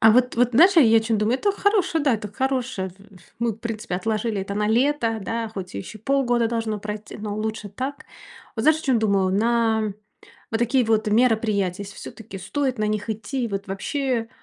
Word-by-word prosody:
А 220 Hz, -, +7 dB
вот 250 Hz, 0 st, +3 dB
вот 245 Hz, 0 st, +3 dB
знаешь, 360 Hz, +9 st, +6 dB
я 225 Hz, -8 st, +7 dB
о -, -, +6 dB
чем 225 Hz, -1 st, 0 dB
думаю: 225 Hz, +5 st, +1 dB
Это 405 Hz, -, +2 dB
хорошая 375 Hz, -6 st, +1 dB
да, 275 Hz, -4 st, +3 dB
это 210 Hz, -2 st, -5 dB
хорошая 255 Hz, -7 st, -2 dB, 0.5 s
Мы, 235 Hz, -1 st, 0 dB
в -, -, -12 dB
принципе, 225 Hz, -3 st, -4 dB
отложили 215 Hz, +1 st, -1 dB
это 200 Hz, +1 st, -4 dB
на 210 Hz, 0 st, 0 dB
лето, 235 Hz, -1 st, +2 dB
да, 225 Hz, +3 st, -3 dB
хоть 190 Hz, -, -7 dB
еще 100 Hz, -, -7 dB
полгода 245 Hz, -1 st, +1 dB
должно 225 Hz, -2 st, -2 dB
пройт 210 Hz, 0 st, -6 dB
но 205 Hz, -1 st, -4 dB
лучше 215 Hz, -1 st, -3 dB
так 260 Hz, +7 st, -5 dB, 0.5 s
Вот, 220 Hz, -, -2 dB
знаешь, 310 Hz, 0 st, +4 dB
о -, -, -13 dB
чем 260 Hz, -4 st, +3 dB
думаю: 200 Hz, -3 st, +2 dB
на 220 Hz, -1 st, +1 dB, 0.6 s
вот 225 Hz, -, 0 dB
такие 240 Hz, +2 st, +2 dB
вот 220 Hz, -1 st, +1 dB
мероприятия, 215 Hz, -5 st, +2 dB
если 195 Hz, -, -10 dB
всё-таки 220 Hz, -3 st, -9 dB
стоит 255 Hz, +6 st, -2 dB
на 215 Hz, -, +1 dB
них 210 Hz, 0 st, -2 dB
идти, 245 Hz, +4 st, -3 dB
и 235 Hz, -, -2 dB
вот 200 Hz, 0 st, -4 dB
вообще 240 Hz, +3 st, -2 dB
225 Hz, 200 wpm, -23 LUFS, 210-250 Hz, 0.6 s, А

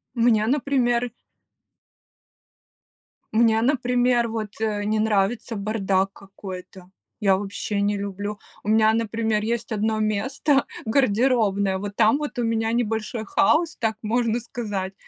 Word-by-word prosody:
Мне, 230 Hz, -2 st, +3 dB
например 245 Hz, -3 st, +1 dB, 2.2 s
Мне, 225 Hz, 0 st, +4 dB
например, 245 Hz, -2 st, +2 dB
вот, 220 Hz, -2 st, -4 dB
э, 210 Hz, -2 st, -1 dB
не 215 Hz, +1 st, +1 dB
нравится 215 Hz, +2 st, 0 dB
бардак 195 Hz, -2 st, 0 dB
какой-то, 190 Hz, -1 st, -10 dB, 0.3 s
я 195 Hz, -2 st, +4 dB
вообще 205 Hz, +1 st, -3 dB
не 205 Hz, 0 st, +1 dB
люблю. 200 Hz, +1 st, -5 dB, 0.2 s
У 210 Hz, -, -4 dB
меня, 220 Hz, 0 st, +5 dB
например, 225 Hz, -1 st, 0 dB
есть 235 Hz, +1 st, -2 dB
одно 220 Hz, +1 st, 0 dB
место, 270 Hz, +7 st, +1 dB, 0.2 s
гардеробная, 220 Hz, -5 st, +2 dB
вот 200 Hz, +1 st, -6 dB
там 225 Hz, +4 st, +4 dB
вот 290 Hz, -4 st, -5 dB
у -, -, +1 dB
меня 225 Hz, 0 st, 0 dB
небольшой 225 Hz, -1 st, -2 dB
хаос, 310 Hz, -, +2 dB
так 220 Hz, -1 st, -1 dB
можно 230 Hz, +1 st, 0 dB
сказать, 205 Hz, -5 st, -4 dB
220 Hz, 125 wpm, -24 LUFS, 205-240 Hz, 2.2 s, меня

